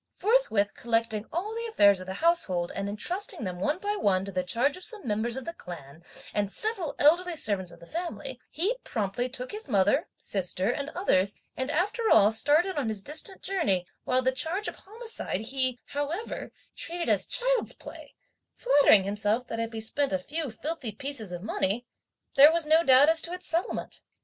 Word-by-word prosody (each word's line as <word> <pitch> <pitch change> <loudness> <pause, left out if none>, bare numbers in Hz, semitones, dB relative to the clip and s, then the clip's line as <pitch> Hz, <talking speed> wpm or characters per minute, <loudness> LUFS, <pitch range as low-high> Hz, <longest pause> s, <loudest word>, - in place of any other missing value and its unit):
Forthwith 390 - +2
collecting 225 -2 -1
all 385 +6 -3
the 465 +1 -3
affairs 200 - +5
of 185 - -8
the 190 - -4
household, 185 - +2
and 200 0 -2
entrusting 345 - -3
them 180 -3 -4
one 295 - 0
by 410 +2 -2
one 190 - +1
to 200 - -6
the 185 -1 0
charge 235 +10 +1
of 365 - -11
some 430 - -8
members 225 +3 -1
of 265 - -6
the 335 - -5
clan 165 - -10 0.3
and 205 -1 0
several 415 - +1
elderly 345 +4 +4
servants 200 - 0
of 170 - -13
the 170 - -13
family, 305 - -5
he 390 +10 0
promptly 220 +3 -2
took 255 0 -5
his 425 -7 -6
mother, 200 -3 +3
sister 190 +2 -1
and 280 +3 -4
others 200 - +2 0.2
and 260 +1 -3
after 410 +8 0
all 205 +1 +6
started 300 +11 +2
on 250 -6 -1
his 210 -3 -3
distant 315 - -3
journey, 205 - 0 0.2
while 255 0 +1
the 260 - +3
charge 335 - -1
of - - -5
homicide 445 - -4
he, 255 +2 -1
however, 295 +9 -4 0.2
treated 340 0 -4
as - - +2
child's - - +1
play, - - -12 0.4
flattering 285 - +5
himself 210 +4 0
that 230 - -4
if 230 0 -2
he 225 - -5
spent 275 +6 -1
a 190 - +2
few 295 - -4
filthy 280 +1 -4
pieces 240 -3 -3
of 175 0 -6
money, 215 +2 -1 0.5
there 290 +2 +9
was 335 -1 0
no 320 +2 +5
doubt 265 0 +7
as 325 0 +4
to 340 - -3
its 365 0 -7
settlement. 335 +3 -2
260 Hz, 190 wpm, -28 LUFS, 205-340 Hz, 0.5 s, there